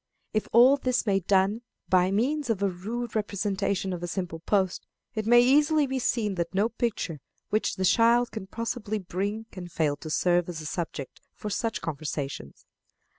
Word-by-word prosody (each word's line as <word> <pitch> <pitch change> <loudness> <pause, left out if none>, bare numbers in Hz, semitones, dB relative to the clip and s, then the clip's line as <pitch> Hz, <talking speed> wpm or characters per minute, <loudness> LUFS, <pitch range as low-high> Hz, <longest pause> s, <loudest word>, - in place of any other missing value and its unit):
If 215 - 0
all 250 +5 +7
this 255 -3 0
may 195 -2 +2
done 195 +4 +2 0.3
by 185 0 +4
means 260 +8 0
of 205 -3 0
a 200 - +3
rude 225 +7 -5
representation 200 -2 -1
of 175 - -5
a 175 - -3
simple 175 -2 -4
post, 190 +1 0 0.3
it 215 -1 -3
may 240 +1 +7
easily 295 +4 +4
be 265 -1 -2
seen 225 -4 0
that 170 +2 -4
no 205 +4 +3
picture 220 -10 -2 0.3
which 215 - +1
the 190 - -1
child 235 +4 +4
can 205 -4 -6
possibly 225 0 -3
bring 200 +3 -3
can 185 -2 -8
fail 155 -4 0
to 155 - -8
serve 175 +2 +2
as 170 -3 -5
a 155 - -8
subject 150 -4 -5
for 210 - -5
such 225 +2 -2
conversations. 145 - -5
200 Hz, 175 wpm, -27 LUFS, 180-230 Hz, 0.3 s, all